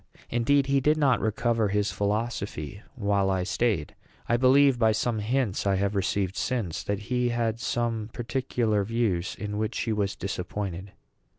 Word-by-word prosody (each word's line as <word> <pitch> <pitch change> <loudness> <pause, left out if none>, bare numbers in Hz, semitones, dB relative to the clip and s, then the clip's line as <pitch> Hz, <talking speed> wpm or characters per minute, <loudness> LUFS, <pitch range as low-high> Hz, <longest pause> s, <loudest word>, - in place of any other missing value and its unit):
Indeed, 135 +4 +3
he 140 0 +2
did 150 +3 +3
not 140 -4 +3
recover 110 0 +1
his 105 +1 0
philosophy 100 -4 -2
while 100 -2 +1
I 95 -1 +1
staid. 100 -5 0 0.3
I 120 - +3
believe, 130 +1 +5
by 110 -2 +4
some 110 +1 0
hints 110 -2 0
I 100 - +3
have 100 +1 0
received 95 0 0
since, 115 -10 -2
that 100 0 -3
he 125 -1 +2
had 115 -1 -1
some 115 -2 -1
particular 115 -3 -1
views 100 -5 -1
in 105 0 -4
which 110 0 -1
he 115 - 0
was 100 -2 -1
disappointed. 95 0 -4
110 Hz, 160 wpm, -27 LUFS, 100-120 Hz, 0.3 s, believe